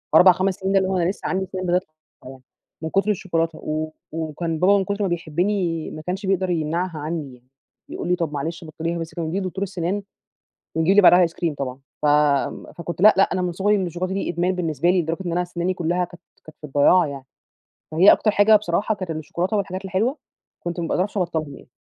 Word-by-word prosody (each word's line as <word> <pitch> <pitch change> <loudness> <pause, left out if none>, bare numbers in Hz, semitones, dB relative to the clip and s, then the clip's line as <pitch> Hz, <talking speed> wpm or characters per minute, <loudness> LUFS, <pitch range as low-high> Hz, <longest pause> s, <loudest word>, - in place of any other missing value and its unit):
4،5 185 +2 +6
سنين 190 0 -2
ده - - +5
اللي 190 0 0
هو 190 - 0
أنا 175 0 +1
لسه 195 - -4
عندي 190 0 -1
سنان 185 -1 -4
بتطلع 180 +1 +2 0.4
يعني، 130 0 -11 0.4
من 160 - -3
كتر 195 +4 +2
الشوكولاتة، 165 -4 -1
و 155 +1 -2 0.3
و 160 0 -3
وكان 165 +1 -3
بابا 200 +4 +5
من 195 - 0
كتر 200 +2 -3
ما - - +1
بيحبني 175 0 -1
ما 155 - -7
كانش 185 +5 -4
بيقدر 190 -1 +1
يمنعها 165 0 -1
عني 150 -3 -4
يعني، 125 0 -19 0.4
يقول - - -5
لي: 180 - +3
"طَب 165 -4 -3
معلش 160 +4 -4
بطليها 165 +2 -4
بس"، 165 0 -6
كان 170 - -3
بيوديني 185 +5 -2
لدكتور 185 +2 -3
السنان 190 +1 -2 0.7
ويجيب 160 +5 +2
لي 205 - +8
بعدها 180 -1 +7
ice - - -7
cream 165 -1 -2
طبعًا، 130 -2 -4 0.2
ف - - +2 0.7
فكنت 170 0 -5
لأ 215 +1 +8
لأ 195 - +6
أنا 185 - 0
من 180 -1 -1
صغري 205 +4 +2
أنا 190 -2 -1
الشوكولاتة 180 +2 -3
دي 195 - -2
إدمان 175 +2 0
بالنسبة 170 -2 0
لي، 180 -1 +3
لدرجة 165 +1 -3
إن 170 - -2
أنا 180 +1 +1
سناني 175 +1 -2
كلها 175 +1 0
كانت 175 0 -14 0.2
كانت 155 - -14
في - - -17
الضياع 150 +5 +4
يعني، 140 -2 -7 0.7
فهي 170 +6 +7
أكتر 215 - +2
حاجة 210 +1 +6
بصراحة 205 +1 0
كانت 185 -4 -6
الشوكولاتة 170 +6 -2
والحاجات 190 -1 -3
الحلوة 205 +9 0 0.5
كنت 175 0 -3
ما 165 - -2
باقدرش 195 +4 -1
أبطلهم 160 -5 -2
يعني. - - -16
175 Hz, 220 wpm, -22 LUFS, 160-190 Hz, 0.7 s, لي